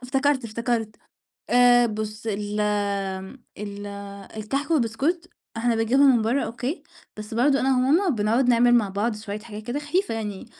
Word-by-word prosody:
افتكرت، 270 Hz, 0 st, +1 dB
افتكرت 225 Hz, -1 st, -2 dB, 0.5 s
آآ 245 Hz, 0 st, +6 dB
بُص 215 Hz, 0 st, -5 dB
ال 210 Hz, 0 st, -3 dB
امم 200 Hz, +2 st, -2 dB
ال 205 Hz, 0 st, -7 dB, 0.5 s
الكحك 275 Hz, +9 st, -3 dB
والبسكوت 305 Hz, +6 st, 0 dB, 0.3 s
إحنا 230 Hz, 0 st, +1 dB
بنجيبهم 255 Hz, +4 st, +4 dB
من 225 Hz, -, +2 dB
برّا 240 Hz, +6 st, +1 dB
أوكي؟ 250 Hz, +7 st, -4 dB, 0.3 s
بس 215 Hz, +1 st, -7 dB
برضه 275 Hz, +4 st, +3 dB
أنا 265 Hz, -1 st, +2 dB
وماما 315 Hz, +9 st, +3 dB
بنقعُد 235 Hz, +1 st, +1 dB
نعمل 240 Hz, 0 st, +5 dB
مع 220 Hz, -4 st, +2 dB
بعض 210 Hz, +3 st, -1 dB
شوية 210 Hz, -1 st, -6 dB
حاجات 215 Hz, -1 st, -9 dB
كده 245 Hz, +6 st, -3 dB
خفيفة 350 Hz, +5 st, -1 dB
يعني 210 Hz, -3 st, -5 dB
230 Hz, 155 wpm, -24 LUFS, 210-265 Hz, 0.5 s, آآ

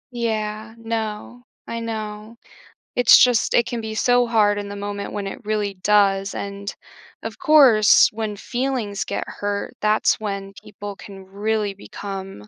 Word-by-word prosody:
Yeah. 220 Hz, -1 st, -3 dB
No. 225 Hz, +1 st, -5 dB, 0.3 s
I 230 Hz, -, -4 dB
know. 220 Hz, 0 st, -6 dB, 0.6 s
It's 245 Hz, -1 st, +7 dB
just 245 Hz, -2 st, +3 dB
it 235 Hz, -, +4 dB
can 235 Hz, -1 st, -4 dB
be 220 Hz, 0 st, -5 dB
so 245 Hz, +2 st, +3 dB
hard 210 Hz, -3 st, +3 dB
in 205 Hz, 0 st, -5 dB
the 200 Hz, -, -7 dB
moment 200 Hz, 0 st, -5 dB
when 205 Hz, -1 st, -4 dB
it -, -, -7 dB
really 210 Hz, -1 st, -1 dB
does, 195 Hz, -1 st, +3 dB
and, 200 Hz, 0 st, -5 dB, 0.5 s
of -, -, -6 dB
course, 280 Hz, -, +6 dB
when 215 Hz, -1 st, -3 dB
feelings 240 Hz, -4 st, -2 dB
get -, -, -4 dB
hurt, 205 Hz, 0 st, -4 dB
that's 215 Hz, 0 st, +2 dB
when 195 Hz, -2 st, -4 dB
people 205 Hz, -1 st, -8 dB
can 195 Hz, -1 st, -12 dB
really 205 Hz, +1 st, -2 dB
become 195 Hz, -, -8 dB
210 Hz, 150 wpm, -22 LUFS, 200-230 Hz, 0.6 s, It's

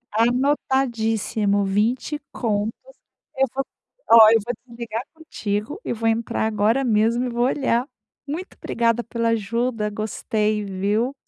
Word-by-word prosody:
Anotadíssimo! 230 Hz, -4 st, +1 dB
20 230 Hz, +9 st, 0 dB
contos. 215 Hz, -2 st, -1 dB, 0.6 s
Eu 270 Hz, 0 st, +2 dB
vou, 270 Hz, -, -1 dB, 0.5 s
oh, 220 Hz, -2 st, +10 dB
eu 225 Hz, -, +5 dB
vou 245 Hz, -, -2 dB
desligar 235 Hz, -1 st, -5 dB
contigo 230 Hz, -, -4 dB
e -, -, -3 dB
vou 225 Hz, 0 st, -2 dB
entrar 225 Hz, -1 st, 0 dB
agora 220 Hz, +5 st, +2 dB
mesmo 230 Hz, +1 st, +2 dB
e 250 Hz, -, -2 dB
vou 240 Hz, +1 st, 0 dB
olhar. 260 Hz, -2 st, +1 dB, 0.4 s
Muito 335 Hz, +7 st, -5 dB
obrigada 235 Hz, 0 st, +1 dB
pela 230 Hz, 0 st, -1 dB
ajuda. 230 Hz, 0 st, -1 dB
Gostei, 215 Hz, 0 st, -1 dB
viu? 205 Hz, +6 st, -1 dB
230 Hz, 130 wpm, -22 LUFS, 215-245 Hz, 0.6 s, oh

